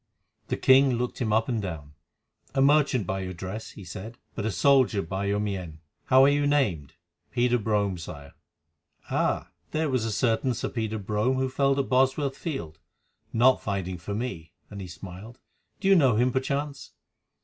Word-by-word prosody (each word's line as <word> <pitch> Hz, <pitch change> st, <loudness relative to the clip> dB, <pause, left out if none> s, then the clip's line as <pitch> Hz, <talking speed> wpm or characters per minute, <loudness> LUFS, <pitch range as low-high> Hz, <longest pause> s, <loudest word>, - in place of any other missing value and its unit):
The -, -, -2 dB
king 130 Hz, 0 st, +5 dB
looked 125 Hz, +2 st, -3 dB
him 110 Hz, -3 st, 0 dB
up 110 Hz, +1 st, +2 dB
and 120 Hz, -4 st, -1 dB
down. 80 Hz, -7 st, -6 dB, 0.6 s
"A 135 Hz, -, +3 dB
merchant 140 Hz, -6 st, +3 dB
by 95 Hz, +2 st, -2 dB
your 95 Hz, -1 st, -5 dB
dress," 95 Hz, +5 st, -6 dB
he 100 Hz, -, -11 dB
said; 95 Hz, +6 st, -8 dB, 0.2 s
"but 110 Hz, -1 st, -3 dB
a -, -, 0 dB
soldier 130 Hz, 0 st, +3 dB
by 95 Hz, +4 st, -3 dB
your 100 Hz, +1 st, 0 dB
mien. 95 Hz, -6 st, -4 dB, 0.3 s
How 130 Hz, 0 st, +6 dB
are -, -, +7 dB
you 145 Hz, 0 st, +2 dB
named?" 95 Hz, -, 0 dB, 0.3 s
"Peter 125 Hz, 0 st, +2 dB
Brome, 100 Hz, -4 st, 0 dB
Sire." 70 Hz, -4 st, -9 dB, 0.8 s
"Ah! -, -, 0 dB, 0.2 s
There 155 Hz, -2 st, -1 dB
was 130 Hz, -3 st, +1 dB
a 115 Hz, -, -1 dB
certain 120 Hz, +3 st, +1 dB
Sir -, -, -3 dB
Peter 110 Hz, -2 st, -3 dB
Brome 105 Hz, +5 st, 0 dB
who 130 Hz, 0 st, 0 dB
fell 135 Hz, +1 st, +1 dB
at 135 Hz, -, 0 dB
Bosworth 135 Hz, +2 st, +2 dB
Field—not 130 Hz, -, -2 dB
fighting 95 Hz, -3 st, -3 dB
for 100 Hz, +4 st, -5 dB
me," 95 Hz, -8 st, -5 dB, 0.2 s
and 100 Hz, -1 st, -7 dB
he 95 Hz, -, -6 dB
smiled. 95 Hz, +6 st, -10 dB, 0.4 s
"Did 195 Hz, -, +1 dB
you -, -, +8 dB
know 135 Hz, -, +4 dB
him 125 Hz, +3 st, +3 dB
perchance?" 140 Hz, +2 st, -3 dB
115 Hz, 175 wpm, -27 LUFS, 95-130 Hz, 0.8 s, you